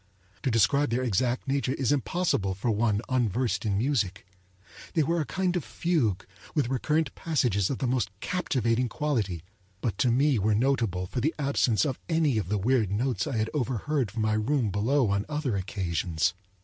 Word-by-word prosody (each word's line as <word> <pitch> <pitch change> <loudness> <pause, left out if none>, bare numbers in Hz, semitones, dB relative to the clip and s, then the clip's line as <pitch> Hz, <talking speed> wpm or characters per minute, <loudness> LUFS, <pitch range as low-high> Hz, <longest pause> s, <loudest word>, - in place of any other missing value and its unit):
To - - 0
describe 115 +5 +3
their 120 +3 0
exact 120 +3 0
nature 135 -1 0
is 135 -2 0
impossible 140 - 0
for 115 +5 -1
one 105 -1 +1
unversed 115 -3 0
in 100 -2 +1
music. 105 -6 0 0.7
They 160 - +4
were 170 +3 +1
a 150 - -4
kind 185 -1 0
of 175 - -1
fugue, 115 - 0 0.3
with 140 -6 +1
recurrent 150 +3 0
passages 120 - 0
of 135 - -2
the - - -2
most 120 -4 0
captivating 125 - 0
quality, 110 - -1 0.4
but 105 -4 -3
to 125 - +3
me 135 +1 +3
were 105 +2 +2
notable 115 -7 +1
for 120 +7 -3
the 155 +5 0
absence 140 -4 +2
of 135 -4 -2
any 155 -8 +2
of 95 - -4
the 105 - +1
weird 110 0 +2
notes 115 +1 -1
I 120 - -2
had 110 0 -1
overheard 130 -1 -1
from 110 +2 -3
my 110 0 +2
room 110 +1 +1
below 115 +4 +2
on 100 0 +1
other 150 -7 -1
occasions. 90 -3 -1
120 Hz, 180 wpm, -27 LUFS, 105-140 Hz, 0.7 s, They